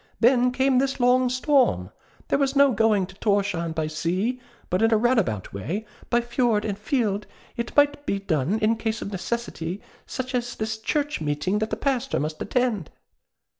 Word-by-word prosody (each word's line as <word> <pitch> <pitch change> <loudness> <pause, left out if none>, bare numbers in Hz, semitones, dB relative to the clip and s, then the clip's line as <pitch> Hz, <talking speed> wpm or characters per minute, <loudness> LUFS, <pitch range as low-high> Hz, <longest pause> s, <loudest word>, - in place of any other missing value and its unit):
Then 250 +1 +4
came 260 0 +2
this 270 0 -1
long 250 +1 +4
storm. 255 - +2 0.4
There - - +2
was 275 0 +1
no 280 -1 +6
going 215 -3 +3
to 195 - -13
Thorshavn 200 -6 0
by 160 -1 -1
sea; 185 +11 -1 0.3
but 185 - +1
in 225 0 +4
a 220 - +5
roundabout 215 - +1
way, 160 - -4 0.2
by 240 0 +3
fjord 235 -3 +1
and 205 -2 -1
fjeld, 210 -2 -1 0.3
it 235 0 -4
might 290 0 +3
be 200 - +1
done 180 -1 0
in 215 0 +2
a - - +1
case 225 0 -2
of 200 - -6
necessity, 190 -3 -4 0.3
such 260 0 -4
as 245 -1 -2
this 220 0 -3
church 290 - -1
meeting 155 +7 0
that 220 0 -1
the - - -1
Pastor 270 0 0
must 155 +1 -4
attend. 235 - 0
220 Hz, 180 wpm, -25 LUFS, 195-250 Hz, 0.4 s, no